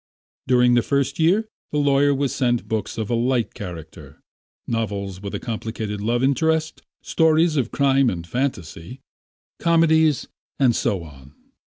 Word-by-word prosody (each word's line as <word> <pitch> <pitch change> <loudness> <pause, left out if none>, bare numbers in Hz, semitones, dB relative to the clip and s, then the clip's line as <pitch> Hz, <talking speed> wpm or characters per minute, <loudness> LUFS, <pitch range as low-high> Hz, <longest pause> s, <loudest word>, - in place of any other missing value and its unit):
During 125 -1 +4
the 120 - +4
first 140 +2 -1
year 190 +7 +3 0.2
the 150 - -1
lawyer 145 0 +3
was 140 -1 -1
sent 120 -2 0
books 110 0 -3
of 110 0 -3
a - - +1
light 120 0 0
character; 85 -5 -10 0.5
novels 100 -4 -3
with 100 -1 -5
a - - -3
complicated 110 -3 -5
love 120 +4 0
interest, 160 +3 0 0.2
stories 160 0 +2
of 125 -5 0
crime 135 -2 +2
and 85 -4 -5
fantasy, 115 - -4 0.6
comedies, 160 -3 +3 0.3
and 125 -4 +3
so 95 -4 -1
on. 70 -2 -15
125 Hz, 145 wpm, -22 LUFS, 105-145 Hz, 0.6 s, During